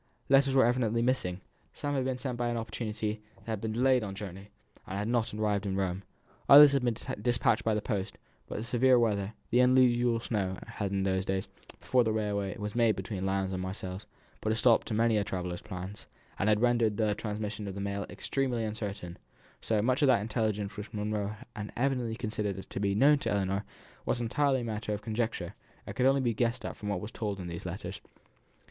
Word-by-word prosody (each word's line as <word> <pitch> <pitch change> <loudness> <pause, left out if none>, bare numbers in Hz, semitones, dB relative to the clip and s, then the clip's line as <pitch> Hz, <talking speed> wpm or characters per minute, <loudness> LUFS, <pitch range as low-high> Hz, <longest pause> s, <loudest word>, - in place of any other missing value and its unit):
Letters 135 0 +5
were 130 - +6
evidently 115 -1 +1
missing. 95 -8 0 0.3
Some 145 0 -3
had 135 -2 0
been 130 -1 -1
sent 130 -1 -3
by 120 0 -1
an 120 0 -1
opportunity 110 -1 -3
that 95 +1 -23
had 110 -3 -3
been 110 -1 -2
delayed 130 +2 +3
on 100 -3 -5
the - - -12
journey, 100 0 -7 0.4
and 95 - -4
had 105 +1 -2
not 120 -1 +1
yet 105 - -6
arrived 105 -1 0
in 95 - -1
Rome. 95 -1 -1 0.5
Others 145 0 +11
had 140 -2 +1
been 120 -2 +1 0.3
despatched 120 0 +2
by 110 -1 +2
the 105 - -2
post, 100 -3 -3 0.3
but - - -5
the 110 - -3
severe 125 +2 +4
weather, 105 -3 +1 0.2
the 120 - +4
unusual 125 -2 +4
snow, 100 -5 -2
had, 100 -2 -4
in 95 0 0
those 95 -1 +1
days, 95 0 -2 0.3
before 125 -1 +3
the 110 - 0
railway 100 -3 -1
was 105 -1 -4
made 115 -2 +3
between 95 -3 -3
Lyons 95 0 0
and 90 - -2
Marseilles, 95 0 -5 0.3
put 110 - 0
a - - +2
stop 115 0 +4
to 110 - -2
many 115 0 +3
a 105 - +2
traveller's 90 -2 -4
plans, 95 +3 -7 0.3
and 100 - +2
had 105 0 +3
rendered 120 -4 +3
the 110 -2 +2
transmission 105 0 -4
of 95 - -5
the - - -5
mail 100 -1 -3
extremely 120 +5 -1
uncertain; 100 -5 -5 0.4
so, 110 -2 +1
much 130 +4 +2
of 145 - +5
that 130 -6 +5
intelligence 105 -2 -1
which 105 +1 -7
Miss - - -4
Monro 105 0 -2 0.2
had 105 -1 -5
evidently 125 -3 0
considered 105 -4 -2
as 95 - -6
certain - - -36
to - - -3
be 100 -1 +1
known 140 +6 +5
to 155 - -2
Ellinor 100 0 0 0.4
was 120 - +1
entirely 130 +2 +1
matter 110 -1 -3
of 105 - -9
conjecture, 110 -5 -2 0.3
and - - -7
could 125 - +3
only 135 0 +4
be 120 -3 +1
guessed 120 +2 -1
at - - -4
from 105 - -6
what 95 -3 -1
was 105 - -6
told 105 -3 -3
in 90 - -5
these 85 -1 -6
letters. - - -6
110 Hz, 220 wpm, -30 LUFS, 100-120 Hz, 0.5 s, Others